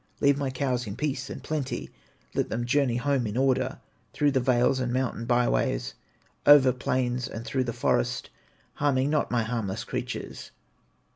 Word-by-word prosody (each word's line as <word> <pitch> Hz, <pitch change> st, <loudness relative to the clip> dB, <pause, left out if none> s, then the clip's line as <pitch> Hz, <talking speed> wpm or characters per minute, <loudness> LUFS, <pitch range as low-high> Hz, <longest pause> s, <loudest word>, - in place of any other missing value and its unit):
Leave 140 Hz, -1 st, +4 dB
my 140 Hz, -1 st, -2 dB
cows 130 Hz, -2 st, -1 dB
in 100 Hz, -, -5 dB
peace 135 Hz, -1 st, -2 dB
and -, -, -7 dB
plenty, 150 Hz, -4 st, -3 dB, 0.4 s
Let -, -, 0 dB
them 120 Hz, +1 st, -2 dB
journey 125 Hz, -1 st, +2 dB
home 135 Hz, -2 st, 0 dB
in 105 Hz, +3 st, -4 dB
order, 130 Hz, -1 st, +1 dB, 0.4 s
Through 145 Hz, -1 st, +2 dB
the 135 Hz, -, +2 dB
vales 125 Hz, +1 st, +2 dB
and 125 Hz, -2 st, -1 dB
mountain 125 Hz, -2 st, -1 dB
by 120 Hz, 0 st, +3 dB
ways, -, -, 0 dB, 0.5 s
Over 135 Hz, -3 st, +7 dB
plains 125 Hz, -1 st, -1 dB
and 115 Hz, +1 st, -7 dB
through 130 Hz, -1 st, -1 dB
the 120 Hz, -, -2 dB
forest, 110 Hz, -, 0 dB, 0.4 s
Harming 140 Hz, -1 st, +1 dB
not 150 Hz, -, +1 dB
my 120 Hz, -2 st, +1 dB
harmless 110 Hz, -2 st, -3 dB
creatures. -, -, -5 dB
125 Hz, 165 wpm, -27 LUFS, 120-135 Hz, 0.5 s, Over